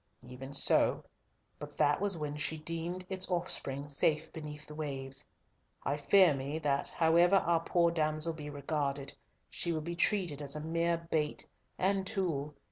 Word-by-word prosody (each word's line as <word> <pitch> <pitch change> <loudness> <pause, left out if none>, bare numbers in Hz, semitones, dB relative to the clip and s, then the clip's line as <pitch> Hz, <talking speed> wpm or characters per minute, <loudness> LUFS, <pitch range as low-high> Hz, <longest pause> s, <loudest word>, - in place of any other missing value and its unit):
"Even 130 +2 -9
so, 140 - +4 0.6
but - - -9
that 145 +4 +3
was 200 -3 +1
when 150 -2 -4
she 155 +1 -1
deemed 165 +3 -4
its 185 -1 -2
offspring 145 -6 -2
safe 150 +2 0
beneath 150 -1 -7
the 150 - -10
waves. 135 -2 -4 0.6
I 140 - 0
fear 175 +3 +5
me 140 +3 -3
that, 145 -3 0
however 170 +3 +4
our 170 -3 +3
poor 170 -1 +3
damsel 155 0 +1
be 150 -2 -7
regarded, 140 -1 -2 0.4
she 170 - -1
will 160 -2 -1
be 170 +3 -4
treated 175 -5 +1
as 140 0 -3
a - - -3
mere 170 +1 +1
bait 150 -2 0 0.3
and 190 0 +1
tool. 150 -8 -2
155 Hz, 160 wpm, -32 LUFS, 145-170 Hz, 0.6 s, fear